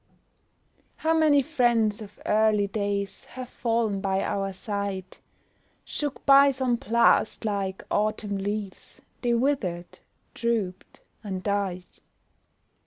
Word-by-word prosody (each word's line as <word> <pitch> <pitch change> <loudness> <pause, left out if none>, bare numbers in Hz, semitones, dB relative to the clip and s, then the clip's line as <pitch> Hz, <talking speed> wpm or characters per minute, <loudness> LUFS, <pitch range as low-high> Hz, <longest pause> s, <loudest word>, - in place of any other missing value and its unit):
How 320 +1 +1
many 300 -3 +4
friends 235 -7 +2
of 210 -1 -11
early 215 -1 +3
days, 200 -1 -3
Have 255 -1 -8
fallen 225 -4 -1
by 190 -1 0
our 195 -1 -1
side; 195 -1 -5 0.7
Shook 290 -2 -4
by 280 0 +8
some 260 -3 0
blast, 235 -3 +2
like 195 -2 -2
autumn 210 -1 0
leaves 205 0 -5 0.2
They 240 -1 +2
withered, 230 -10 -1 0.3
drooped, 220 -6 -3 0.2
and 190 -3 -4
died. 195 -3 -1
210 Hz, 105 wpm, -26 LUFS, 195-240 Hz, 0.7 s, by